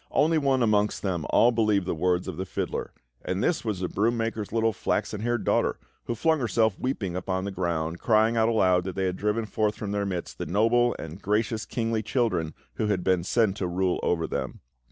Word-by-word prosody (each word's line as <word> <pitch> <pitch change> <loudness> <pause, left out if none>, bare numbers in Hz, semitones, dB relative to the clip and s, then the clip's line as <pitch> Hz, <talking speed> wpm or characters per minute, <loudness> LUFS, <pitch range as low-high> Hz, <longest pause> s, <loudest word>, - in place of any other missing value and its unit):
Only 160 +2 +3
one 135 -3 +2
amongst 105 -2 +1
them 90 -6 -1
all 120 - +5
believed 105 -5 +2
the - - -1
words 90 +2 0
of - - -4
the 95 - -3
fiddler; - - -3 0.3
and 95 +2 -2
this 175 - +1
was 105 -5 -2
the 90 - 0
broom 115 +6 0
maker's 115 -2 -3
little 115 0 +1
flaxen 105 +2 -2
haired 120 0 -1
daughter, - - +1 0.3
who 120 - -2
flung 160 +6 +2
herself 110 -3 +1
weeping 105 -9 -2
upon 95 +1 -2
the 100 - -3
ground, 85 -2 -2
crying 110 0 +3
out 115 0 +3
aloud 90 -5 +3
that 95 - -4
they 95 - 0
had 90 -1 -1
driven 105 +3 -1
forth 105 -1 0
from 105 -3 -5
their 100 -1 -1
midst 90 -3 -5
the - - -3
noble 115 +5 +3
and 80 +4 -8
gracious 110 +2 0
kingly 115 -2 -1
children 110 - -1 0.2
who 110 - 0
had 100 -4 0
been 95 -2 +2
sent 105 0 +1
to 95 - -1
rule 90 +1 0
over 80 -2 0
them. - - -4
105 Hz, 215 wpm, -26 LUFS, 90-115 Hz, 0.3 s, all